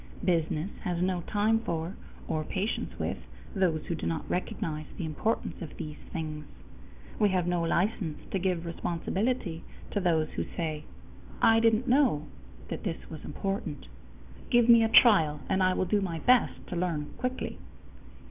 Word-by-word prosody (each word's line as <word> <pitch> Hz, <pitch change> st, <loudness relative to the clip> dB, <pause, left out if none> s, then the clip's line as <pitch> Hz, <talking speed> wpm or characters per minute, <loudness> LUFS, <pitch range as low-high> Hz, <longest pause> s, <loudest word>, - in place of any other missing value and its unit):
Business 165 Hz, +1 st, +1 dB
has 175 Hz, -2 st, -1 dB
no 180 Hz, 0 st, +1 dB
time 215 Hz, +2 st, +3 dB
for 170 Hz, -4 st, -3 dB, 0.3 s
or 155 Hz, -1 st, -1 dB
patience 200 Hz, +7 st, -2 dB
with -, -, -2 dB, 0.4 s
those 175 Hz, -5 st, +1 dB
who -, -, -2 dB
do 165 Hz, -, -3 dB
not 165 Hz, -1 st, -2 dB
recognize 155 Hz, -3 st, -3 dB
the 175 Hz, -, -3 dB
importance 205 Hz, +10 st, -2 dB
of 160 Hz, -, -7 dB
these 150 Hz, -1 st, -6 dB
things. 155 Hz, -2 st, -4 dB, 0.8 s
We 210 Hz, -2 st, +5 dB
have 185 Hz, -2 st, +1 dB
no 175 Hz, -1 st, +1 dB
license 170 Hz, -1 st, 0 dB
to 195 Hz, -, 0 dB
give 180 Hz, -2 st, 0 dB
responsibility 170 Hz, +2 st, -2 dB, 0.3 s
to 205 Hz, -, 0 dB
those 165 Hz, -4 st, +2 dB
who -, -, -3 dB
say: 155 Hz, -3 st, -2 dB, 0.5 s
"I 225 Hz, 0 st, +6 dB
didn't 225 Hz, +2 st, +3 dB
know 245 Hz, -, +3 dB, 0.4 s
that -, -, -4 dB
this 170 Hz, -4 st, -5 dB
was 155 Hz, -, -8 dB
important. 195 Hz, -3 st, -4 dB, 0.6 s
Give 240 Hz, -1 st, +5 dB
me 235 Hz, -1 st, +8 dB
a 225 Hz, -, +2 dB
trial, 165 Hz, -, +6 dB
and 190 Hz, -, +1 dB
I 185 Hz, 0 st, +3 dB
will -, -, +1 dB
do 205 Hz, +3 st, +2 dB
my 175 Hz, -4 st, -2 dB
best 245 Hz, +8 st, +3 dB
to -, -, -3 dB
learn 170 Hz, -4 st, -2 dB
quickly." 255 Hz, -, -3 dB
180 Hz, 160 wpm, -29 LUFS, 160-210 Hz, 0.8 s, me